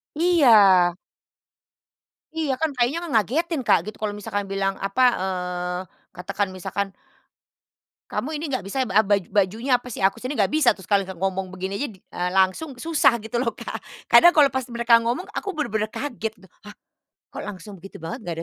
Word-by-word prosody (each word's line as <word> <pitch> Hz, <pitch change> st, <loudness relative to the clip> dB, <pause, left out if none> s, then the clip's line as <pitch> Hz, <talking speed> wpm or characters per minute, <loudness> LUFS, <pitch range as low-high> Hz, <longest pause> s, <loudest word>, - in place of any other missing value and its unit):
Iya. 215 Hz, -, +5 dB, 1.4 s
Iya 310 Hz, -4 st, 0 dB
kan, 320 Hz, -, +1 dB
kayaknya 250 Hz, +6 st, +1 dB
ngengagetin 305 Hz, -, 0 dB
Kak -, -, +5 dB
gitu 215 Hz, -, -8 dB
kalau 210 Hz, -1 st, -1 dB
misalkan 205 Hz, 0 st, -3 dB
bilang 195 Hz, 0 st, 0 dB
apa, 195 Hz, +6 st, -3 dB, 0.2 s
eee, 180 Hz, -1 st, -3 dB, 0.4 s
katakan 190 Hz, +3 st, -2 dB
misalkan 195 Hz, +2 st, -3 dB, 1.2 s
"Kamu 300 Hz, -, -3 dB
ini 305 Hz, +1 st, -4 dB
nggak 260 Hz, -7 st, -3 dB
bisa 200 Hz, +7 st, -4 dB
ab 215 Hz, +3 st, +4 dB
baj 200 Hz, -3 st, +1 dB
bajunya 220 Hz, +6 st, +1 dB
apa 245 Hz, 0 st, -10 dB
sih?" -, -, -6 dB
Aku 195 Hz, 0 st, +2 dB
sendiri 260 Hz, +3 st, -4 dB
nggak -, -, +2 dB
bisa 305 Hz, -4 st, +4 dB
tuh 205 Hz, -, -16 dB
sekalian 195 Hz, -1 st, +1 dB
ngomong 190 Hz, -1 st, -2 dB
begini 190 Hz, +1 st, -4 dB
aja 285 Hz, +6 st, -2 dB
di 190 Hz, -, -19 dB
eee, 180 Hz, 0 st, -4 dB
langsung 190 Hz, +11 st, +1 dB
susah 290 Hz, -7 st, +3 dB
gitu 220 Hz, +3 st, -5 dB
loh 235 Hz, -1 st, 0 dB
Kak. -, -, -7 dB, 0.3 s
Kadang 345 Hz, 0 st, +8 dB
kalau 295 Hz, -4 st, +6 dB
pas 260 Hz, -1 st, -3 dB
mereka 235 Hz, 0 st, +4 dB
ngomong 250 Hz, +12 st, -2 dB
aku 395 Hz, -, -3 dB
bener-bener 220 Hz, -, -2 dB
kaget 230 Hz, -6 st, -4 dB
gitu, 190 Hz, -, -18 dB, 0.2 s
"Hah, 210 Hz, -, -10 dB, 0.6 s
kok -, -, -6 dB
langsung 200 Hz, -1 st, -9 dB
begitu 195 Hz, +3 st, -11 dB
banget 165 Hz, 0 st, -6 dB
nggak 175 Hz, -, -3 dB
215 Hz, 175 wpm, -23 LUFS, 190-270 Hz, 1.4 s, Kadang